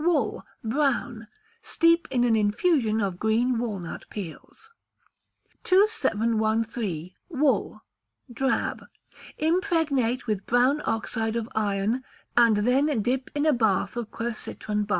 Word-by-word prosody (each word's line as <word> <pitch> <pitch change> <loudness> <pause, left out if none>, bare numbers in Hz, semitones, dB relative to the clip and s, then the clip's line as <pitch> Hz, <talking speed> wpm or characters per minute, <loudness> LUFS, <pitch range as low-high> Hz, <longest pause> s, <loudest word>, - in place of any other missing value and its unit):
Wool 345 0 +1 0.2
(Brown). 240 -2 -1 0.3
Steep 335 0 +2
in 250 -2 +1
an 235 -2 +3
infusion 220 +1 +2
of 190 -3 -2
green 230 +3 +1
walnut 200 -8 -5
peels. 210 - -9 0.9
2713. 225 - +1 0.2
Wool 290 -3 0 0.5
(Drab). 265 +2 -1 0.5
Impregnate 315 - +1
with 210 -4 -2
brown 255 +5 +3
oxide 225 0 -1
of 230 -1 -2
iron, 210 +3 0 0.3
and 230 -3 +5
then 265 -1 +2
dip 255 +3 -1
in 290 +1 +1
a 310 - +4
bath 215 -4 +1
of 235 -2 -4
quercitron 215 -2 -4
bark. - - -26
235 Hz, 110 wpm, -26 LUFS, 215-275 Hz, 0.9 s, and